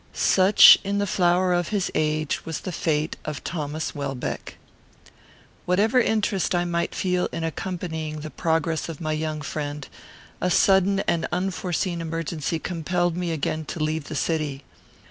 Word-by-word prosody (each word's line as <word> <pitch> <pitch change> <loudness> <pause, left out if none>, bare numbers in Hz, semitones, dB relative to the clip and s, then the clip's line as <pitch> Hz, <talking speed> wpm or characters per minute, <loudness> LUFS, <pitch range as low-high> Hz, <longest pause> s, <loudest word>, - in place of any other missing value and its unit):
Such, 190 +2 +7
in 200 +1 -1
the 205 - +1
flower 180 -1 +2
of 175 -2 0
his 205 -3 -1
age, 155 -1 0
was 160 -2 -5
the 185 - -5
fate 155 -2 -1
of 150 -2 -5
Thomas 155 -1 -3
Welbeck. 140 -3 -5 1.1
Whatever 210 +8 +3
interest 210 -6 +1
I 175 0 +1
might 170 0 -1
feel 180 -1 0
in 165 - -4
accompanying 160 -2 -4
the 155 0 -7
progress 165 -1 -1
of 160 - -7
my 155 -2 -2
young 155 0 -2
friend, 145 -1 -4 0.5
a 180 - +1
sudden 195 +2 +4
and 170 -3 0
unforeseen 180 -1 -2
emergency 165 -1 -3
compelled 175 +1 -1
me 175 -1 -2
again 155 0 -2
to 165 - -6
leave 155 -1 -1
the 155 - -6
city. 150 -3 -1
165 Hz, 150 wpm, -24 LUFS, 155-180 Hz, 1.1 s, Such